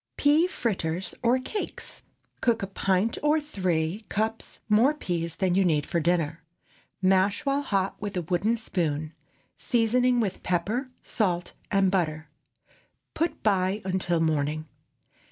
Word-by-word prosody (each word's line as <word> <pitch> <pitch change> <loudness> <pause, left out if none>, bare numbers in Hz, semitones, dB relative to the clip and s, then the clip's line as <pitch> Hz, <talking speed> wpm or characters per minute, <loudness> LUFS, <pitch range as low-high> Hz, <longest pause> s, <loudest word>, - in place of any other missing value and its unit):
PEA 300 +4 +4
FRITTERS 190 - -2
OR 245 +1 +3
CAKES. 335 +11 -5 0.4
✠ - - -39
Cook 230 -4 +2
a - - +1
pint 195 +2 0
or 300 +1 +3
three 185 - -1
cups 220 +2 -2
more 230 +8 +4
peas 170 - -3
than 190 -3 +1
you 195 +2 +4
need 155 -5 +2
for 170 - 0
dinner. 165 -1 0 0.6
Mash 190 +8 +3
while 280 +1 +2
hot 195 -8 -1
with 205 -2 -4
a 180 - -1
wooden 190 +8 +1
spoon, 155 -8 -2 0.4
seasoning 245 0 +2
with 210 -5 -1
pepper, 210 +9 -1
salt, 180 -5 -1 0.2
and 195 -2 +3
butter. 160 -4 -1 0.8
Put 330 +1 -2
by 195 0 +1
until 185 -2 0
morning. 155 -1 0
195 Hz, 135 wpm, -27 LUFS, 170-230 Hz, 0.8 s, PEA